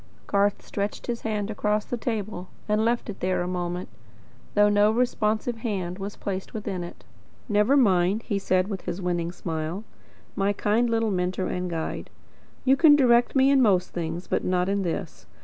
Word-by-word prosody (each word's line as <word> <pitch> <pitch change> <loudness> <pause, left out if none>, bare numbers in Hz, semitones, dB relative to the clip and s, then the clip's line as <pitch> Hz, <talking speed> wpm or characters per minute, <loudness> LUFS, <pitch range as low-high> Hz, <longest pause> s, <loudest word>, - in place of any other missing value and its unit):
Garth 200 0 +1
stretched 200 0 -3
his 235 -1 -3
hand 215 -1 -2
across 210 0 0
the - - -3
table, 215 -6 -4 0.2
and 210 +1 +2
left 235 +1 0
it 210 - -6
there 185 -1 0
a - - -3
moment; 180 0 -3 0.7
though 205 0 +6
no 205 0 +4
responsive 225 -1 0
hand 195 -6 -3
was 200 +1 -5
placed 190 +1 -5
within 200 -4 -3
it. 175 - -10 0.4
"Never 210 +5 +3
mind," 195 -3 +3
he 205 -4 -1
said, 185 -1 +1
with 195 -3 -4
his 175 - -3
winning 175 -2 -1
smile, 165 +2 -4 0.5
"my 200 +1 +1
kind 220 +4 +1
little 225 -1 +1
mentor 185 0 -1
and 180 0 -2
guide. 165 -2 -4 0.6
You 265 +1 +6
can 295 +1 +7
direct 240 -3 +4
me 270 +1 +5
in 275 -1 +5
most 190 -6 +3
things, 170 +1 -4
but - - -1
not 180 0 +1
in 200 0 0
this. 170 -3 -4
205 Hz, 180 wpm, -26 LUFS, 180-225 Hz, 0.7 s, can